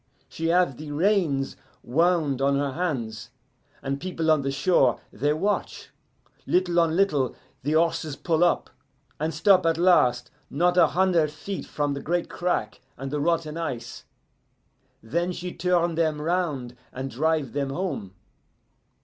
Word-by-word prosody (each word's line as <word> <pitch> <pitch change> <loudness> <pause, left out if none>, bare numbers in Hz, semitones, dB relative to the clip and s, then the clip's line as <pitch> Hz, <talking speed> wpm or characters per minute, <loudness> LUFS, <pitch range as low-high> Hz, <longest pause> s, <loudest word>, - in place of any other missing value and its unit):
She 165 - -4
have 170 -6 +2
the 155 0 -8
reins 155 -5 +1 0.3
wound 155 -1 +1
on 140 0 +2
her 140 -1 -1
hands, 125 - -3 0.5
and 140 +1 -3
people 165 -3 0
on 155 -2 +3
the 135 - -2
shore, 135 -3 +2
they 145 +7 0
watch. 195 +7 -2 0.6
Little 180 -1 +2
on 165 -1 +2
little 150 -10 +1 0.3
the 145 +4 -1
horses 160 -2 +1
pull 160 +3 +1
up, 175 - +1 0.5
and 155 +2 -1
stop 185 +4 +4
at 165 - +2
last 125 -9 +3 0.2
not 175 +5 +2
a 180 - +6
hunder' 180 -4 +2
feet 155 +6 -6
from 145 -1 -1
the 140 - -5
great 175 +4 -1
crack 175 -12 -2 0.2
and 135 0 -6
the 150 - -1
rotten 165 0 0
ice. 120 -8 -5 1.0
Then 170 +10 -1
she 180 0 -6
turn 175 -2 +1
them 160 -2 0
round 150 -7 -2 0.2
and 130 +1 -5
drive 150 -1 0
them 140 -1 -1
home. 135 - -4
155 Hz, 150 wpm, -25 LUFS, 135-175 Hz, 1.0 s, a